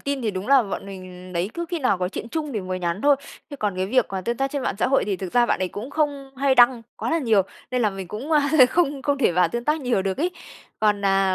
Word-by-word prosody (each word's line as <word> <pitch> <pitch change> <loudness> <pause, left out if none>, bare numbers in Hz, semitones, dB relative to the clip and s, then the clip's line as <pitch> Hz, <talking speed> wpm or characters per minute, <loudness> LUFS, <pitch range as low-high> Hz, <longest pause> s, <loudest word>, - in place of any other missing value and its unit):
tin 280 -2 -3
thì 220 - 0
đúng 190 0 -5
là 275 -2 +6
bọn 200 -2 -5
mình, 185 -1 -10
đấy, 180 +3 -1
cứ 340 - -3
khi 345 -1 -2
nào 250 -9 +1
có 180 0 -1
chuyện 220 +4 -6
chung 300 +1 -3
thì 215 - -2
mới 185 0 -4
nhắn 175 +2 -2
thôi, 285 -1 +5 0.3
chứ 285 - -6
còn 205 -6 -2
cái 185 0 -1
việc 255 +4 +2
mà 190 -1 -3
tương 235 +6 -2
tác 270 +2 -1
trên 280 -1 -3
mạng - - -1
xã - - +2
hội 270 - +3
thì 200 -2 -1
thực 185 -1 -6
ra 240 -1 +4
bạn - - +1
đấy 185 - -1
cũng 215 +9 -7
không 285 -2 -1
hay 270 0 +2
đăng 245 -1 +5
quá - - -3
là 330 - +2
nhiều, 225 -9 +3 0.3
nên 250 -1 0
là 210 - +2
mình 195 -2 -7
cũng, 255 +10 -5
ơ, 300 - +5 0.3
không 290 -5 +1
không 285 0 0
thể 245 - +3
vào 180 0 +3
tương 235 +6 -4
tác 300 +3 +1
nhiều 245 -7 0
được 190 -1 -2
ấy. 340 +5 +1 0.5
Còn, 210 -2 +2
à, 195 -1 +3
230 Hz, 295 wpm, -23 LUFS, 190-275 Hz, 0.5 s, là